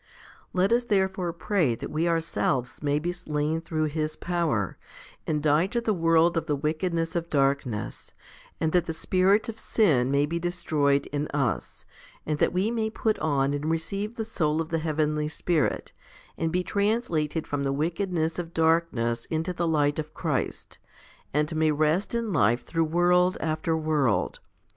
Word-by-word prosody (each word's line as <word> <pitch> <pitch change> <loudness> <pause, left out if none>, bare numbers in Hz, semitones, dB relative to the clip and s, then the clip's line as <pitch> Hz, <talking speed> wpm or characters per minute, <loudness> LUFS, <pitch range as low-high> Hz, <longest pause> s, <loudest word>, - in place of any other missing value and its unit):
9. 180 - +3
Let 195 - +3
us 240 0 +2
therefore 190 -4 +1
pray 170 - 0
that - - -7
we 160 +3 0
ourselves 160 -6 -1
may 145 -1 +1
be 170 +4 -1
slain 160 -2 -2
through 160 -1 -2
His 155 0 -2
power, 165 - -1 0.5
and 150 -2 0
die 155 +4 +3
to 235 +4 -1
the 230 -2 0
world 165 -1 +3
of 165 - -1
the 150 - +1
wickedness 165 +3 -1
of 170 0 -2
darkness, 135 -6 -1 0.5
and 160 - +1
that 175 -1 +2
the 165 - -2
spirit 190 +6 +2
of 225 -1 -6
sin 140 - +2
may 140 +1 +3
be 170 +3 -2
destroyed 155 -5 +1
in 145 +1 -1
us, 135 -5 -2 0.4
and 150 -1 -1
that - - +3
we 190 +5 0
may 220 -2 0
put 220 0 -1
on 140 -3 +1
and 145 +2 -2
receive 200 +7 -2
the 225 -3 -3
soul 155 -5 0
of 165 0 -2
the 165 - 0
heavenly 155 -1 0
Spirit, 155 0 -1 0.4
and 165 -1 -1
be 180 +1 0
translated 190 -8 0
from 145 -1 -2
the 135 0 0
wickedness 165 +2 -1
of 170 -1 -6
darkness 160 -8 +1
into 165 +3 -2
the 170 -1 -1
light 145 -2 +2
of 155 0 -6
Christ, - - -3 0.5
and 150 +3 0
may 155 0 +3
rest 155 +8 +1
in 230 -4 -1
life 120 -4 +2
through 165 -1 0
world 180 +3 +3
after 160 0 -1
world. 145 - +1
160 Hz, 170 wpm, -26 LUFS, 150-180 Hz, 0.5 s, 9